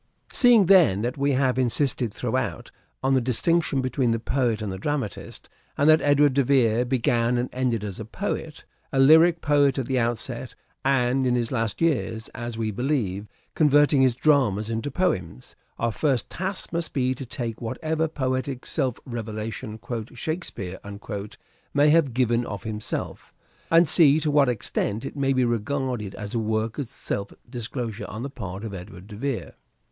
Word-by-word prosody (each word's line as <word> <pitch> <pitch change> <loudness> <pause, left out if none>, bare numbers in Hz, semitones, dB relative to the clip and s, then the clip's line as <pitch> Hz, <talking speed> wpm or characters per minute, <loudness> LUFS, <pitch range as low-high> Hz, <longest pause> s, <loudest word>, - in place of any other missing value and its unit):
Seeing, 240 -5 +6
then, 165 - +5
that 120 +2 -1
we 140 0 +1
have 130 -1 +1
insisted 125 -1 0
throughout - - -3 0.3
on 135 +1 +2
the 130 - +3
distinction 140 +4 +1
between 130 -1 0
the 115 - +2
poet 120 -1 0
and 105 -3 -4
the 95 - -6
dramatist, 135 -2 -4 0.3
and 145 - +3
that 155 - +5
Edward 145 -1 +4
de 140 +1 +3
Vere 125 -3 +3
began 120 -1 +1
and 125 +1 -1
ended 125 -4 0
as 100 -3 -5
a 110 - -5
poet; 160 - -5 0.3
a 135 - -2
lyric 160 +5 +6
poet 145 -3 +3
at 135 - -1
the 130 0 0
outset, 120 +1 -3 0.3
and 130 -1 +2
in 125 - +2
his 120 -2 -1
last 115 -2 -2
years, 120 -8 0
as 120 -2 -6
we 110 -1 -1
believe, 105 -4 -1 0.3
converting 145 -2 +4
his 130 -3 +4
dramas 115 -7 +2
into 115 +5 -2
poems: 95 - -2 0.2
our 115 0 0
first 130 -1 0
task 190 0 -4
must 170 -1 -2
be 130 -2 +1
to 130 - -7
take 120 -2 -5
whatever 160 +7 -1
poetic 130 -3 -3
self 130 -6 -1
revelation 110 -1 -5 0.2
" 110 - -17
Shakespeare 120 - -4 0.7
" - - -37
may 145 +1 +5
have 150 -7 +3
given 120 -2 +2
of 100 -2 -6
himself, 110 -1 -5 0.3
and 165 0 +5
see 155 -2 +5
to 150 -1 0
what 145 -3 +4
extent 110 0 -2
it - - -6
may 135 -1 +1
be 130 -2 +2
regarded 120 -2 -2
as 105 -1 -7
a 115 - 0
work 110 +2 -1
of 140 - -3
self 100 -5 -4 0.2
disclosure 120 -2 -5
on 110 +3 -6
the 140 - -5
part 100 -6 -7
of 110 -3 -5
Edward 90 0 -9
de 105 0 -10
Vere. 135 +2 -3
125 Hz, 175 wpm, -25 LUFS, 115-140 Hz, 0.7 s, Seeing